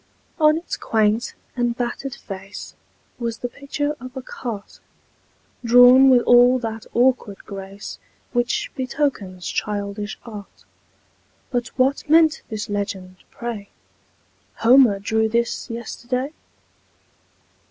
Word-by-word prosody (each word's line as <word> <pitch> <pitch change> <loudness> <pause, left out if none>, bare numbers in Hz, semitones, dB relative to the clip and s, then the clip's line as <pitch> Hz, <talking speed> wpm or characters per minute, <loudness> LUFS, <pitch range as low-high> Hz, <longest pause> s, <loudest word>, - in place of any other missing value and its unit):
On 305 0 +5
its 335 - -5
quaint 220 +1 +1 0.2
and 240 -1 0
battered 245 +2 -3
face 195 0 -9 0.5
Was 230 -1 -3
the 245 - -3
picture 290 +3 -3
of 255 +1 -9
a - - -3
cart, 225 -5 -7 0.8
Drawn 245 +3 +8
with 245 -2 +5
all 245 +1 +6
that 225 -2 -5
awkward 240 -4 +1
grace 195 0 -8 0.3
Which 240 +1 0
betokens 255 -9 -2
childish 205 0 -3
art; 210 -4 -11 0.9
But 245 -2 -1
what 270 +3 +1
meant 320 0 +5
this 215 -2 -4
legend, 195 -3 -4
pray: 230 -4 -6 0.9
"Homer 240 -3 +6
drew 220 +2 0
this 235 +1 -1
yesterday?" 250 +4 -4
235 Hz, 110 wpm, -22 LUFS, 210-255 Hz, 0.9 s, Drawn